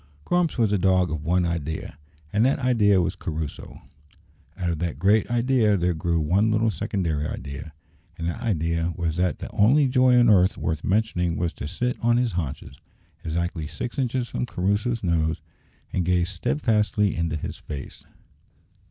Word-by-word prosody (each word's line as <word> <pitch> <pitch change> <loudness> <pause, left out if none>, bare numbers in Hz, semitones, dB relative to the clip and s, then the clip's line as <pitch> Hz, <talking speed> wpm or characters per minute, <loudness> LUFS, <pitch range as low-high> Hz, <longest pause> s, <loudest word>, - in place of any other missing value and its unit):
Grumps 175 - +1
was 110 -4 +2
a 100 - +2
dog 90 -2 +2
of 80 -2 -3
one 90 +2 +2
idea, 80 -4 -3 0.4
and 105 - +3
that 135 +3 +3
idea 115 -7 +3
was 90 - 0
Crusoe. 80 -1 -6 0.7
Out 90 -2 -1
of 80 - -3
that 85 -6 -2
great 100 +6 +3
idea 120 -3 +2
there 90 0 +1
grew 85 +1 0
one 95 +8 +2
little 110 +1 +2
secondary 80 -4 -2
idea, 70 +3 -7 0.5
and 85 - -3
that 85 - -4
idea 85 -6 0
was 85 -2 -2
that 90 0 +1
the - - -8
only 135 +8 +4
joy 130 -1 +4
on 120 - +5
earth 95 -3 +4
worth 80 -2 -2
mentioning 95 -5 0
was 85 -1 -1
to 70 - -6
sit 125 +10 -2
on 120 0 +3
his 120 -2 +1
haunches, 70 -5 -5 0.4
exactly 85 0 -2
six 120 - -5
inches 125 -1 -1
from 125 - -3
Crusoe's 105 +4 -1
nose, 80 -3 +1 0.5
and 90 - +1
gaze 90 0 +1
steadfastly 105 - +1
into 85 -1 -1
his 75 - -5
face. 70 -4 -8
90 Hz, 170 wpm, -24 LUFS, 85-110 Hz, 0.7 s, on